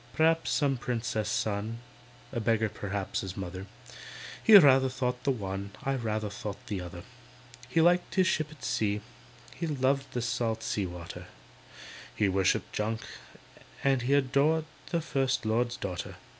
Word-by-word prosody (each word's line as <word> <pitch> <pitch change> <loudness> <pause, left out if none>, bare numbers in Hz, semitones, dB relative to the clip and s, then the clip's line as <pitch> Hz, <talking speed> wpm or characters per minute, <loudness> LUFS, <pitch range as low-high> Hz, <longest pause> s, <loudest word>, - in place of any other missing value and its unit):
P'r'aps 160 +1 +3
some 140 -3 +2
Princess's 110 -3 -2
son— 110 +2 -1 0.5
A 120 - -2
beggar 110 -1 +2
p'r'aps 100 -1 -3
his 95 -1 -6
mother. 95 0 -5 0.8
He 220 - +8
rather 135 -6 +6
thought 125 -1 -2
the - - +3
one, 100 -4 -4
I 135 - 0
rather 110 -4 -2
think 100 0 -5
the 100 -3 -3
other. 85 0 -8 0.7
He 165 +6 +3
liked 175 +2 +3
his 185 -2 +4
ship 155 -4 +1
at 155 -2 -14
sea, 105 -1 0 0.5
He 170 - -3
loved 135 -2 0
the 120 - -1
salt 115 -2 -1
sea 100 -3 -1
water, 85 -1 -8 0.9
He 105 - +2
worshipped 95 -1 +1
junk, 110 +1 -1 0.8
and 135 -2 +3
he 135 +4 +2
Adored 145 +4 +3 0.2
the 170 - 0
First 135 -6 0
Lord's 120 +2 +1
daughter. 90 -2 -5
120 Hz, 150 wpm, -29 LUFS, 105-135 Hz, 0.9 s, He